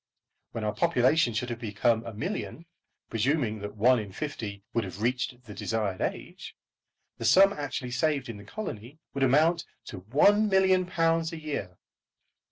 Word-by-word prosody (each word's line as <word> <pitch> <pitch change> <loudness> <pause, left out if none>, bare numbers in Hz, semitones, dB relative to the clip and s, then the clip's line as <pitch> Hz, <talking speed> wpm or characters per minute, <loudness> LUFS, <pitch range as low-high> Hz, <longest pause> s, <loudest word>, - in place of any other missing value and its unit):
When 115 - -4
our 105 0 -1
population 130 -2 +2
should 120 +2 -2
have 120 - -5
become 115 +1 +1
a - - -4
million, 175 - -4 0.5
presuming 115 -1 0
that 105 +1 -7
one 115 +5 +4
only 105 - -4
in 100 - -12
fifty 100 -5 -5
would 115 - +1
have 95 +2 -7
reached 125 0 -1
the 110 -4 -10
desired 105 -3 -2
age, - - -5 0.6
the - - -5
sum 190 - +6
actually 135 -5 -4
saved 140 +1 0
to 115 - -6
the 100 -1 -11
colony 120 - -7 0.2
would 140 - -4
amount 155 +6 +3 0.3
to 95 - -8
£1,000,000 180 - +3
a 165 - -6
year. 105 - -5
125 Hz, 160 wpm, -28 LUFS, 110-160 Hz, 0.6 s, sum